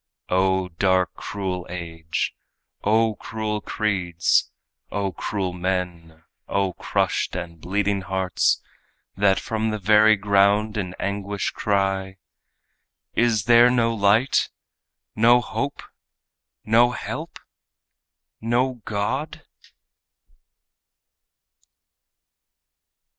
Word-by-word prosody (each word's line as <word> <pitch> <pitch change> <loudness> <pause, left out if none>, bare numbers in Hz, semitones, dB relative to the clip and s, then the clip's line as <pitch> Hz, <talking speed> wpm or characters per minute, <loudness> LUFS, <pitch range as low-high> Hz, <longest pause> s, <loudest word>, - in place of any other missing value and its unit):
O 95 0 +2
dark 95 +1 +1
and - - -13
cruel 90 -3 -4
age! 80 -2 -4 0.5
O 110 +1 +3
cruel 110 -1 -4
creeds! 90 -6 0 0.4
O 100 -1 -1
cruel 95 +1 -3
men! 90 -3 -3 0.2
O 95 -2 0
crushed - - -1
and 85 -2 -6
bleeding 100 +1 0
hearts, 95 -2 0 0.6
That 95 0 +3
from 110 0 -2
the 110 - -2
very 105 +2 +5
ground 100 +1 +2
in 90 -3 -3
anguish 100 0 -2
cry: 95 -1 -1 1.0
"Is 115 -4 +2
there 120 +2 +6
no 115 -2 +2
light 110 +4 +3 0.7
no 120 +3 +6
hope 120 - -4 0.8
no 115 +2 +5
help 125 - -6 1.0
no 120 +2 0
God?" 130 +9 -3
100 Hz, 90 wpm, -23 LUFS, 95-110 Hz, 1.0 s, there